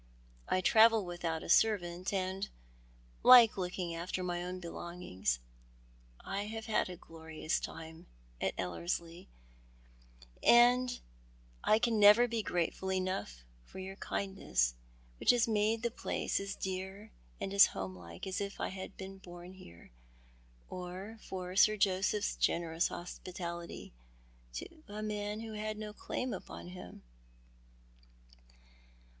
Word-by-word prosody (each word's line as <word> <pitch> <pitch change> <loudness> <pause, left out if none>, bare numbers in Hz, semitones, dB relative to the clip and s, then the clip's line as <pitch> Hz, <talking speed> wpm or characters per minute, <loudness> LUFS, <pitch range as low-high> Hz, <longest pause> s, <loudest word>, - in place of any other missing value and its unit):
" - - -29
I 185 - +2
travel 220 +1 +6
with 175 0 -7
out 160 -1 -1
a - - -7
servant, 180 -4 +3
and 190 +1 -2 0.7
like 245 -3 +9
looking 180 -2 -3
after 175 +2 -3
my 175 -1 -2
own 180 +1 -4
belongings. 170 - -3 0.8
I 200 +1 -3
have 220 +1 -5
had 215 -4 +1
a 180 - -6
glorious 160 -1 -4
time 160 0 -8 0.3
at - - 0
Ellerslie, 165 - -3 1.1
and 245 +1 +5 0.6
I 215 - +5
never 210 0 +7
can 245 - +1
be 230 -1 0
grateful 180 0 -1
enough 185 - -2 0.2
for - - -13
your 190 +1 -6
kindness, 190 - 0 0.5
which - - 0
has 240 -2 +6
made 220 +1 +1
the 235 - 0
place - - -1
as 195 0 -4
dear 190 +3 -5 0.3
and 195 - -3
as 200 - +9
homelike 90 -3 -7
as 190 +1 -2
if 200 0 -4
I - - -1
had 190 +1 -7
been 195 0 -8
born 175 0 -11
here, 85 - -14 0.8
or 185 +5 -7
for 185 -1 -6
Sir 215 +2 +6
Joseph's 195 +2 +1
generous 170 0 +1
hospitality 175 - -6 0.6
to 65 - -7
a 210 +1 -6
man 210 0 -3
who 225 -1 -6
had 215 0 -3
no 210 -1 -6
clSim 250 +2 -3
upon 180 - -9
him." 180 0 -10
190 Hz, 130 wpm, -33 LUFS, 175-210 Hz, 1.1 s, like